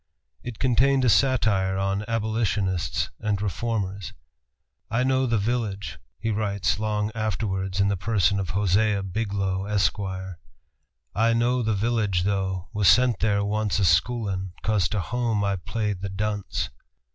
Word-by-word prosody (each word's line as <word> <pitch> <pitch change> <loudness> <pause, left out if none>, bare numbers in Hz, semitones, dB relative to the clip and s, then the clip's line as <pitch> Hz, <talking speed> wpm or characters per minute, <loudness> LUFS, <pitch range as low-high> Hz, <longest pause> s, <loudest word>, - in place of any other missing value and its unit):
It 120 -3 -7
contained 130 +1 +3
a - - +4
satire 100 -6 +2
on 95 +1 -1
abolitionists 110 -5 -1
and 105 -2 -1
reformers. 100 -2 -3 0.8
"I 125 +4 +1
know 130 0 +2
the 115 -1 +1
village," 100 -6 -2 0.2
he 115 0 -2
writes 100 -2 0
long 105 0 -1
afterwards 95 -3 -2
in 100 - +4
the 100 - +1
person 100 -1 +1
of 95 -2 -3
Hosea 100 +1 +2
Biglow, 95 -1 -2
Esquire. 95 -3 -1 0.7
"I 115 +2 +3
know 120 +2 +2
the 110 -2 0
village 105 -4 0
though, 95 -2 -1
was 105 -3 +2
sent 125 +4 +5
there 100 -2 +1
once 105 0 0
A 100 - +2
schoolin', 95 +1 +1
'cause 105 -4 +1
to 105 - -1
home 115 +1 -1
I 100 -1 +1
played 105 +1 -3
the 100 - -3
dunce!" 105 +1 -2
105 Hz, 145 wpm, -25 LUFS, 95-115 Hz, 0.8 s, sent